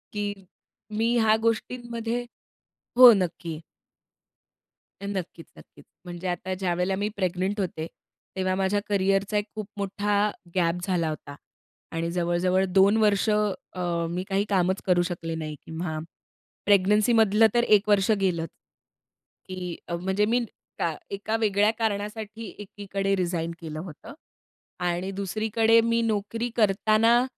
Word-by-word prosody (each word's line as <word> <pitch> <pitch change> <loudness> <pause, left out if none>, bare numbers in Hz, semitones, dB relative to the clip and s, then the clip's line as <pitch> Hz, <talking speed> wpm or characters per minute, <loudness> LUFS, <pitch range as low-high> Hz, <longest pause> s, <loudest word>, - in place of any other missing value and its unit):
की 205 -1 -2 0.6
मी 225 +1 +2
ह्या 220 -1 +4
गोष्टींमध्ये 235 +1 -2 0.8
हो, 250 -1 +11
नक्की. 170 -4 -2 1.4
अ, - - -6
नक्कीच 185 -4 -5
नक्कीच, - - -17 0.2
म्हणजे 175 +1 -6
आता 180 +1 -2
ज्यावेळेला 180 0 -1
मी 205 +2 -1
प्रेग्नंट 190 +2 -1
होते, 165 -4 -3 0.5
तेव्हा 185 0 0
माझ्या 190 +2 +1
करिअरचा 195 +1 +1
एक 205 - 0
खूप 215 -2 -5
मोठा 205 +1 0 0.2
गॅप 170 -2 +2
झाला 175 -4 +1
होता 145 -2 -7 0.6
आणि 165 +1 -2
जवळ-जवळ 180 +2 +1
2 195 +3 +4
वर्ष, 210 -1 +3
अ, 185 -5 -1
मी 180 +2 -3
काही 195 +1 +1
कामच 190 -1 +1
करू 180 -1 +4
शकले 165 -1 -4
नाही 155 -1 -5
किंवा 160 -1 -4 0.7
प्रेग्नन्सीमधलं 210 +2 +4
तर 240 0 +3
1 210 +1 0
वर्ष 205 0 +4
गेलंच, 170 -4 0 1.0
की 180 -2 -5
अ, 170 - -2
म्हणजे 190 +4 0
मी 240 +2 +1 0.3
का 165 - 0 0.2
एका 205 +3 -2
वेगळ्या 210 -1 +3
कारणासाठी 215 0 -3
एकीकडे 195 -1 -3
रिझाइन 170 -2 -1
केलं 155 -2 -6
होतं 175 - -10 0.7
आणि 175 +2 -1
दुसरीकडे 220 +3 +2
मी 230 0 +1
नोकरी 225 +2 -1
करताना 220 +3 +4
195 Hz, 125 wpm, -26 LUFS, 180-215 Hz, 1.4 s, हो